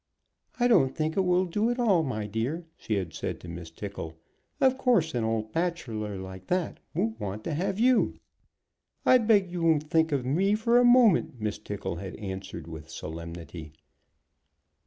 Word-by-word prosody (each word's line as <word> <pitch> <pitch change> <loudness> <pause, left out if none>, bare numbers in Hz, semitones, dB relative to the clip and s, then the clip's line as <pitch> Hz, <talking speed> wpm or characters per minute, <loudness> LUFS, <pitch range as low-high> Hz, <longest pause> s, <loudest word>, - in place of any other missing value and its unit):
"I 245 - +4
don't 135 - +4
think 155 0 -1
it 195 - +3
will 180 0 +2
do 210 +6 0
at 240 - -1
all, 210 -9 +3
my 120 -8 -3
dear," 120 +11 -3
she 110 - -3
had 95 -4 -3
said - - -4
to - - -10
Miss 85 -1 -7
Tickle. 85 -2 -7 0.4
"Of 265 -2 +4
course 235 - +2
an 120 -2 0
old 110 -1 -1
bachelor 120 - -2
like 95 0 -9
that 180 -2 -1 0.2
won't 110 0 -1
want 105 0 -4
to 165 - -3
have 185 +5 -1
you." 250 +1 +3 0.9
"I 255 - +7
beg 210 -5 +3
you 175 -1 -3
won't 155 -2 +2
think 160 -1 +3
of 135 -4 0
me 190 +10 +2
for 235 +3 +3
a - - +5
moment," 240 - +5
Miss 105 -1 -3
Tickle 100 -4 -5
had 95 +1 -6
answered, 95 -2 -6
with 80 -1 -9
solemnity. 80 -1 -8
135 Hz, 180 wpm, -28 LUFS, -, 0.9 s, I